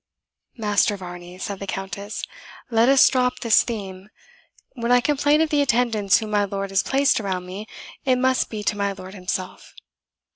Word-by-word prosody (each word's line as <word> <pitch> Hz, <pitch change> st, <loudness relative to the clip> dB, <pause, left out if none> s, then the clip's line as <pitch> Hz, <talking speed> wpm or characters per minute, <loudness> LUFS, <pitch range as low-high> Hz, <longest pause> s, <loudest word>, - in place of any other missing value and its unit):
"Master 210 Hz, -1 st, +1 dB
Varney," 175 Hz, -1 st, -9 dB
said 195 Hz, +1 st, -5 dB
the 195 Hz, -, -6 dB
Countess, 195 Hz, +2 st, -5 dB, 0.5 s
"let 230 Hz, +2 st, +4 dB
us 275 Hz, -1 st, +7 dB
drop 250 Hz, -1 st, +1 dB
this 230 Hz, -2 st, +5 dB
theme. 195 Hz, -4 st, -6 dB, 0.6 s
When 235 Hz, -2 st, -2 dB
I 245 Hz, -, +6 dB
complain 290 Hz, +3 st, +2 dB
of 320 Hz, -, 0 dB
the 295 Hz, -1 st, +3 dB
attendants 230 Hz, -6 st, +2 dB
whom 215 Hz, -2 st, -5 dB
my 205 Hz, -1 st, +2 dB
lord 195 Hz, 0 st, -4 dB
has 195 Hz, +1 st, +3 dB
placed 275 Hz, -1 st, +2 dB
around 190 Hz, -4 st, -3 dB
me, 195 Hz, +4 st, -7 dB, 0.4 s
it 260 Hz, -1 st, +3 dB
must 260 Hz, 0 st, +1 dB
be 215 Hz, -2 st, -5 dB
to 210 Hz, -, 0 dB
my 200 Hz, -1 st, -1 dB
lord 190 Hz, 0 st, -10 dB
himself. 185 Hz, -1 st, -5 dB
210 Hz, 175 wpm, -23 LUFS, 195-245 Hz, 0.6 s, us